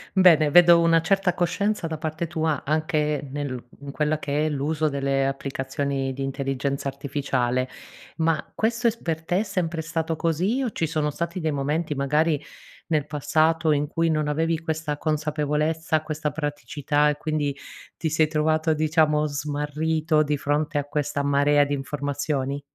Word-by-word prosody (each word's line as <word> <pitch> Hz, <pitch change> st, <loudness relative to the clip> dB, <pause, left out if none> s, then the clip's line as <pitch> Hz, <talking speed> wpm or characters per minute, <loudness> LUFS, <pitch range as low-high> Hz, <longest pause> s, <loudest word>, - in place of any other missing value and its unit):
Bene, 160 Hz, -6 st, +6 dB
vedo 175 Hz, 0 st, +8 dB
una 165 Hz, -1 st, +4 dB
certa 195 Hz, 0 st, +2 dB
coscienza 180 Hz, +1 st, 0 dB
da 160 Hz, -1 st, -4 dB
parte 160 Hz, +1 st, -3 dB
tua 160 Hz, -3 st, -1 dB
anche 150 Hz, -1 st, 0 dB
nel 135 Hz, -4 st, -4 dB
in 140 Hz, 0 st, -8 dB
quella 150 Hz, +1 st, 0 dB
che 150 Hz, +1 st, -1 dB
è -, -, +1 dB
l'uso 150 Hz, +2 st, 0 dB
delle 135 Hz, -1 st, 0 dB
applicazioni 135 Hz, 0 st, -2 dB
di 135 Hz, -, -7 dB
intelligenza 135 Hz, 0 st, -2 dB
artificiale, 135 Hz, -2 st, -1 dB, 0.5 s
ma 160 Hz, -2 st, 0 dB
questo 230 Hz, +2 st, -1 dB
è -, -, +4 dB
s 230 Hz, -, -13 dB
per 160 Hz, -1 st, -2 dB
te 180 Hz, +3 st, 0 dB
è -, -, +1 dB
sempre 175 Hz, -5 st, -2 dB
stato 165 Hz, 0 st, -2 dB
così 180 Hz, -, 0 dB
o 245 Hz, -, 0 dB
ci 165 Hz, -, -1 dB
sono 155 Hz, -1 st, -1 dB
stati 170 Hz, +4 st, -3 dB
dei 160 Hz, -2 st, -1 dB
momenti, 150 Hz, +2 st, -1 dB
magari 150 Hz, +2 st, +1 dB, 0.5 s
nel 150 Hz, -3 st, 0 dB
passato 155 Hz, +2 st, +2 dB
in 145 Hz, 0 st, +1 dB
cui 165 Hz, +1 st, 0 dB
non 155 Hz, -1 st, 0 dB
avevi 160 Hz, +2 st, 0 dB
questa 155 Hz, -2 st, -3 dB
consapevolezza, 155 Hz, +1 st, 0 dB
questa 155 Hz, -1 st, -2 dB
praticità 145 Hz, 0 st, 0 dB
e 145 Hz, -, 0 dB
quindi 150 Hz, -3 st, -2 dB, 0.4 s
ti 160 Hz, -, -1 dB
sei 155 Hz, -1 st, +3 dB
trovato, 155 Hz, +1 st, +1 dB
diciamo, 155 Hz, -1 st, +2 dB
smarrito 150 Hz, +2 st, 0 dB
di 150 Hz, -1 st, 0 dB
fronte 150 Hz, +2 st, -1 dB
a 145 Hz, -, +1 dB
questa 145 Hz, 0 st, -2 dB
marea 145 Hz, +1 st, +4 dB
di 145 Hz, 0 st, -2 dB
informazioni? 145 Hz, 0 st, -2 dB
150 Hz, 160 wpm, -24 LUFS, 145-160 Hz, 0.5 s, vedo